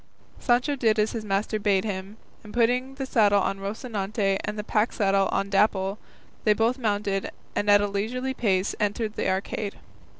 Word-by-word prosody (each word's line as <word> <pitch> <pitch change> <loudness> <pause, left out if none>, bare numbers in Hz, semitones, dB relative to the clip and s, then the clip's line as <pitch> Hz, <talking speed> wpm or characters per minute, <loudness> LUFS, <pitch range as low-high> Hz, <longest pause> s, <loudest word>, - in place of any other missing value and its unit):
Sancho 250 +3 +2
did 225 -5 +2
as 215 +1 +2
his 225 -2 -4
master 210 +1 -1
bade 200 -2 +2
him, 195 0 -5 0.3
and 210 +1 -11
putting 250 +3 +1
the 270 -1 -4
saddle 205 -5 +4
on 195 0 -1
Rocinante 200 -1 -2
and 210 0 -4
the 210 - -3
pack 215 +1 +1
saddle 195 -2 +2
on 195 - -1
Dapple, 195 0 +2 0.4
they 215 - +5
both 230 +4 +1
mounted 205 -4 -1 0.3
and 205 - 0
at 205 0 +7
a 205 - +1
leisurely 240 +6 -2
pace 200 -6 +1
entered 210 +1 -1
the - - -1
arcade. 200 +2 -2
210 Hz, 175 wpm, -26 LUFS, 200-230 Hz, 0.4 s, at